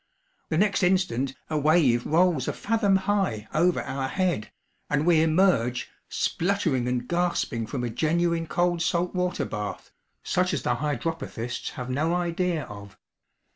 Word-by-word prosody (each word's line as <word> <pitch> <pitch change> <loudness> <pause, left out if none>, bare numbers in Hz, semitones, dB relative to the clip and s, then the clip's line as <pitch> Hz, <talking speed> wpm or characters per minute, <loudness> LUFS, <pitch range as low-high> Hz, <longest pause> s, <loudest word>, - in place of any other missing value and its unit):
The 155 - 0
next 205 +3 +2
instant, 180 -9 +1
a 155 -1 -1
wave 145 -6 +3
rolls 165 -4 +2
a - - -1
fathom 210 -3 +1
high 190 - 0
over 175 +3 +2
our 135 0 -3
head, 175 - -1 0.4
and 145 +1 +1
we 170 -2 +5
emerge, 160 -7 +2 0.2
spluttering 165 -9 0
and 125 0 -1
gasping 170 -10 -1
from 125 +1 -3
a 120 - -1
genuine 165 +5 0
cold 175 +1 +1
salt 175 +1 0
water 180 -5 -1
bath, 105 -3 -5 0.3
such - - +1
as - - -3
the - - +1
hydropathists 145 -4 -3
have 125 0 -5
no 155 +6 +1
idea 175 -2 -1
of. 100 -1 -11
160 Hz, 145 wpm, -26 LUFS, 125-180 Hz, 0.4 s, we